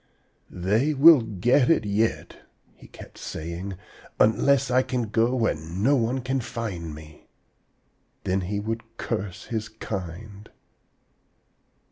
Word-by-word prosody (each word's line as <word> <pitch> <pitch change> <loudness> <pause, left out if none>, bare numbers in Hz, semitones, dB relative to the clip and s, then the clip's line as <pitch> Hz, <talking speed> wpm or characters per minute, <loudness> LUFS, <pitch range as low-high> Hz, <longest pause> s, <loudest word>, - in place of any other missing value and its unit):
'They 110 +12 0
will 150 0 +8
get 115 +5 +2
it 165 - +3
yet,' 105 +3 -1 0.3
he - - -17
kept - - -13
saying, 85 +4 -6 0.4
'unless 130 +5 +3
I 130 +1 +4
can 125 -2 -2
go 115 +3 +2
where 115 -3 +2
no 90 - 0
one 125 +1 0
can 130 +2 -1
find 100 -9 -5
me.' 75 0 -14 1.0
Then 95 +1 0
he 100 +3 -3
would 115 +2 -5
curse 100 -5 -4
his 110 -2 -4
kind. 100 0 -7
110 Hz, 120 wpm, -25 LUFS, 95-125 Hz, 1.0 s, will